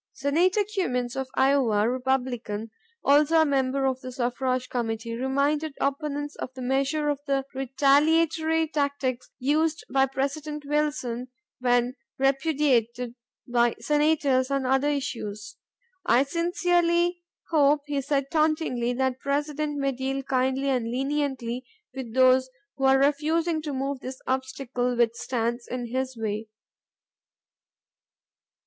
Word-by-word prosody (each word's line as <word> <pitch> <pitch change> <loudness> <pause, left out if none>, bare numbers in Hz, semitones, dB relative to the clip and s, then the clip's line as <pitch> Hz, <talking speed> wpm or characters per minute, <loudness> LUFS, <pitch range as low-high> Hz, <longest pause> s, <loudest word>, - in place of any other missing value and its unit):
Senator 340 +9 +2
Cummins 250 -10 -1
of 265 -1 -2
Iowa, 265 -6 +3
Republican, 245 -4 -2 0.3
also 300 +3 +5
a - - +4
member 270 -1 +1
of 260 -1 0
the 255 - -7
Suffrage 255 0 -1
Committee, 230 -2 -3
reminded 280 +4 0
opponents 290 +1 -2
of - - -5
the 260 - -7
measure 275 +4 0
of 290 -2 -1
the 275 -1 0
retaliatory 315 +4 +2
tactics 280 -4 -2
used 305 +4 +1
by 270 0 +4
President 290 +3 -3
Wilson 285 -5 -1 0.3
when 245 0 +2 0.2
repudiated 270 -4 +1 0.3
by 240 -1 +2
senators 295 -3 +2
on 275 -1 0
other 270 +3 +2
issues. 215 -7 -4 0.5
"I 250 - +4
sincerely 345 +2 +1 0.3
hope," 295 -2 +4
he 290 -1 -1
said 275 0 -1
tauntingly, 305 -6 +1
"that 260 +1 +1
the 255 - -27
President 295 +1 -1
may 275 -1 +1
deal 270 +1 -3
kindly 265 +1 0
and 250 -4 +1
leniently 265 -2 -2 0.3
with 255 -3 -7
those 260 0 +5 0.3
who 270 - -1
are 265 0 +6
refusing 310 +4 +1
to 305 -1 -4
remove 275 0 -2
this 260 0 -7
obstacle 260 -1 -2
which 235 -1 +3
stands 235 0 -2
in 245 -2 -5
his 260 -1 -2
way. 220 0 -3
270 Hz, 125 wpm, -26 LUFS, 250-295 Hz, 0.5 s, are